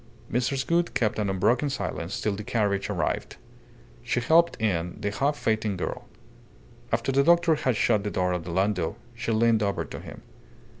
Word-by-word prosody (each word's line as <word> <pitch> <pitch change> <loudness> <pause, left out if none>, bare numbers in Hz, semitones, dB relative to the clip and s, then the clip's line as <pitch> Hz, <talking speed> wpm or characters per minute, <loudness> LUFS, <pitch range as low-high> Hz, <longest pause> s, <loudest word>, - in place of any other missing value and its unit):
Mrs. 125 +3 0
Gould 170 +1 +1
kept 110 -3 +1
an 105 -2 0
unbroken 120 +9 +2
silence 90 -8 -4
till 105 - 0
the 105 - -6
carriage 105 -4 0
arrived. - - -2 0.7
She 120 - -1
helped 165 +7 +3
in 90 -6 -1
the 105 -1 -2
half 140 +7 0
fainting 110 -3 0
girl. - - -4 0.8
After - - 0
the 135 +1 +4
doctor 170 +1 +5
had 130 -5 0
shut 105 -1 +2
the 105 - -2
door 90 -2 0
of 90 -1 -3
the 85 - -8
landau, 95 -2 0 0.2
she 115 -1 -3
leaned 115 0 +3
over 100 -1 -1
to - - -8
him. - - -11
110 Hz, 180 wpm, -26 LUFS, 100-130 Hz, 0.8 s, doctor